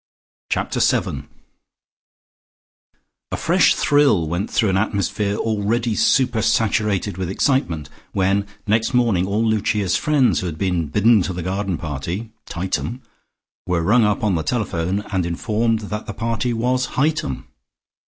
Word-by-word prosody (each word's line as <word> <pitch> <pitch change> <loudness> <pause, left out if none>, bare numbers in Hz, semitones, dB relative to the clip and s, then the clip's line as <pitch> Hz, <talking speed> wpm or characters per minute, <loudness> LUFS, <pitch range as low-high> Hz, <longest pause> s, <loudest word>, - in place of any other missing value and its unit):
Chapter - - -1
SEVEN - - 0 2.0
A - - -2
fresh - - +3
thrill 140 - +3
went 85 +6 -2
through 110 -4 +1
an - - 0
atmosphere 100 0 -1
already 110 +2 0
super 115 +1 +2
saturated 105 -5 +1
with 90 -2 -2
excitement, 95 - 0 0.2
when 100 +1 +1 0.2
next 110 +4 +1
morning 110 -7 +2
all 105 +3 0
Lucia's 105 -3 +1
friends 130 - +2
who 90 - -3
had 80 -2 -5
been 90 -3 0
bidden 105 +7 +4
to 90 +1 -2
the 90 -1 -5
garden 95 0 -2
party 85 - -5 0.2
(Tightum) 95 +8 -3 0.7
were 90 -2 0
rung 115 +7 +4
up 105 0 +1
on 105 -3 +2
the 80 - 0
telephone 95 0 -1
and 95 -2 +1
informed 110 +6 0
that 105 +1 -5
the - - -6
party 115 +1 -1
was 125 +2 0
Hightum. 150 - 0
105 Hz, 140 wpm, -21 LUFS, 90-115 Hz, 2.0 s, bidden